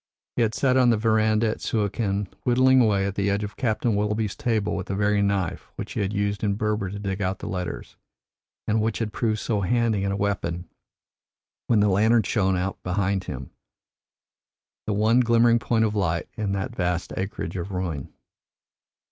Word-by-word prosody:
He - - +1
had 115 -1 +1
sat 130 -2 +2
on 125 -2 +5
the 115 - +4
verandah 110 0 +2
at - - -4
Suakin, 100 -2 -1 0.2
whittling 130 +1 +5
away 100 -4 +2
at 100 - -2
the 100 0 0
edge 100 +1 0
of 105 0 -6
Captain 115 -2 0
Willoughby's 105 0 -1
table 115 -7 0
with 95 -2 -4
the 95 - -2
very 105 0 +2
knife 100 -4 -1
which - - -6
he - - -3
had 100 -1 0
used 100 0 -1
in 100 -1 +1
Berber 105 -2 -1
to 100 - -6
dig 100 -1 -3
out 95 0 -1
the - - -8
letters, 90 -2 -5 0.7
and 110 0 +2
which 110 0 0
had 110 -2 -3
proved 110 -3 0
so 105 -1 -1
handy 110 0 +1
a 100 0 0
weapon 95 -4 -2 1.0
when 110 -3 +4
the 105 - +4
lantern 110 +4 +4
shone 95 -2 +1
out 95 +2 -3
behind 95 +1 -1
him 65 - -6 1.4
the 105 - +1
one 110 +4 +3
glimmering 115 -1 +4
point 115 -1 +1
of 105 - -1
light 85 -5 0
in 105 -3 -2
that 100 +5 -3
vast 90 -2 -1
acreage 95 -3 -4
of 95 +1 -4
ruin. 85 -7 -4
105 Hz, 185 wpm, -25 LUFS, 95-110 Hz, 1.4 s, on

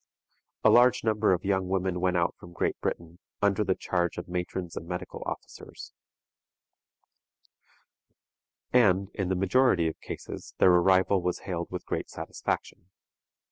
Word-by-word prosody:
A - - +6
large 125 +1 +5
number 110 -2 +2
of 90 +1 0
young 95 -1 +1
women 95 -1 -1
went 90 -1 +2
out 85 0 +1
from 85 - -12
Great - - -1
Britain, 85 +1 -4 0.2
under 100 0 +2
the 95 -2 +1
charge 85 -2 -1
of 85 - -6
matrons 90 0 -4
and 85 - -6
medical 90 0 -6
officers, - - -8 2.8
and, 100 -5 +4
in 95 -3 -2
the 95 - +1
majority 95 -2 +3
of 80 - -5
cases, - - -8
their 90 - +6
arrival 95 +2 +4
was 90 0 -2
hailed 85 -3 -3
with 90 - -6
great - - -3
satisfaction. 90 - -5
95 Hz, 140 wpm, -28 LUFS, 90-95 Hz, 2.8 s, A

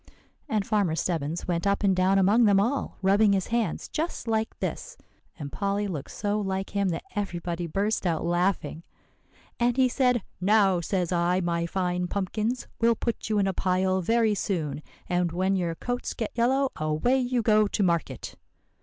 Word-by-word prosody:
"And 210 -3 0
Farmer 200 -7 +1
Stebbins 165 -1 -2
went 175 +2 0
up 200 +1 +1
and 195 -2 +3
down 185 +1 +3
among 205 +5 +4
them 200 -2 +5
all, 245 +7 -1
rubbing 200 +2 +4
his 190 -2 -1
hands 230 -7 -1
just 320 -5 -4
like 220 0 -1
this;" - - -4 0.4
and 140 -3 -6
Polly 200 +1 -1
looked 160 -9 -5
so 205 0 -2
like 195 -1 -3
him 200 -1 0
that 165 -1 -3
everybody 175 -4 -3
burst 200 +3 -1
out 165 -2 -1
laughing; 175 -2 0 0.8
"and 240 +1 +2
he 260 -1 +5
said, 250 -3 +1 0.2
'Now, 195 -2 +4
says 180 0 -1
I, 175 +1 +2
my 170 -1 -1
fine 180 0 -1
pumpkins, 215 +6 -2
we'll 230 0 +4
put 230 -1 -3
you 215 - +1
in 200 - +3
a 195 - 0
pile 185 +1 +1
very 225 +3 +2
soon, 170 -8 -2 0.3
and 175 -1 0
when 185 +3 +1
your 170 -3 -1
coats 245 +7 -4
get 225 - -3
yellow, 260 +3 +2
away 155 +13 +1
you 250 -2 0
go 215 -1 +4
to 200 - -1
market. 170 -3 -1
195 Hz, 175 wpm, -26 LUFS, 175-220 Hz, 0.8 s, them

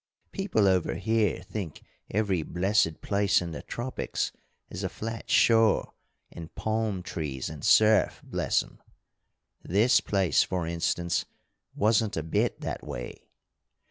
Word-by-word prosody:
People 120 - +1
over 95 -2 +2
here 110 -5 0
think 95 -5 -6 0.3
every 100 -4 0
blessed 90 0 +1
place 100 0 +2
in 85 -1 -5
the - - -6
tropics 125 +2 -3 0.4
is - - -7
a - - -1
flat 115 +1 -6
shore 115 -2 +4 0.4
and 80 -1 -10
palm 110 -4 -1
trees 75 -6 -4
and 75 -3 -9
surf, 110 0 +4
bless - - 0
'em! - - -18 0.8
This 105 +7 +3
place, 95 -4 +2
for 90 -2 -1
instance, 85 +1 -1 0.5
wasn't 110 -1 +2
a 80 - -1
bit 80 - -1
that - - -4
way. - - -8
100 Hz, 130 wpm, -28 LUFS, 85-110 Hz, 0.8 s, shore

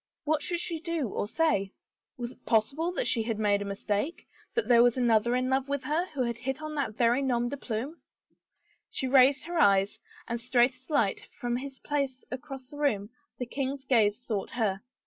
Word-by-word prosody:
What 305 0 +1
should 345 +2 -2
she 335 -2 -3
do 330 -7 -2
or 205 - -2
say? 205 -8 +1 0.4
Was 240 -1 -4
it 255 - -19
possible 275 +10 +1
that - - -1
she 230 - +1
had 220 -1 -2
made 205 -2 +2
a - - -3
mistake 205 - -2
— - - -30
that 465 - +1
there 235 -1 +7
was 245 +1 +4
another 235 -1 +3
in 255 0 +1
love 265 +1 0
with 280 -1 -1
her 325 +5 0
who 285 -7 -2
had 235 -1 -2
hit 265 +3 -3
on 310 0 -5
that 280 -8 -2
very 240 +2 +3
nom 240 -3 +1
de 285 - -3
plume? 260 +6 -4 0.9
She - - -3
raised 265 +1 +5
her 340 +1 -2
eyes, 195 -6 +4 0.3
and 235 0 -3
straight 245 +1 +3
as 255 +2 -19
light, 255 -10 +1
from 240 0 -1
his 270 +1 -7
place 275 -3 -2
across 265 0 -7
the 290 - -9
room, 220 -8 0 0.3
the 250 - -3
king's 270 +2 -3
gaze 215 -5 +3
sought 215 -5 -3
her. 205 -5 -1
255 Hz, 205 wpm, -29 LUFS, 230-285 Hz, 0.9 s, there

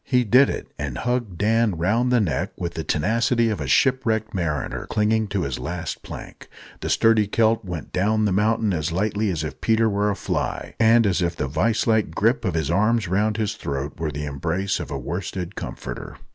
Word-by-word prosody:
He 125 -1 +2
did 125 +5 +5
it, - - -5
and 70 -4 -3
hugged 120 -7 -2
Dan 110 -2 +2
round 115 +9 +1
the 125 - +4
neck 95 -8 -1
with 85 -1 -3
the 80 - -4
tenacity 115 +9 +1
of 105 - -3
a 70 - -3
shipwrecked 110 - +2
mariner 80 -7 -2
clinging 110 0 +1
to 100 -2 -1
his 70 -5 -3
last 85 -1 -4
plank. - - -10 0.3
The - - -4
sturdy 115 -2 +4
Celt 115 +2 +2
went 90 -5 -6
down 105 +3 +2
the 105 - +1
mountain 105 +1 +2
as 80 -1 -1
lightly 105 +4 0
as 80 -4 -2
if 75 - -6
Peter 115 0 +3
were 105 0 +1
a 100 - 0
fly, - - -3
and 115 0 +5
as 95 -2 +1
if 85 -1 0
the 65 - -2
vice 105 +11 +1
like 110 -2 +1
grip - - +2
of - - -1
his 80 -4 0
arms 110 0 +2
round 105 +4 +1
his 110 -2 -1
throat 70 -5 -5
were 80 -1 -1
the 75 +1 -4
embrace 85 +8 -2
of - - -6
a - - -3
worsted 90 +1 -4
comforter. - - -7
105 Hz, 205 wpm, -23 LUFS, 85-110 Hz, 0.3 s, did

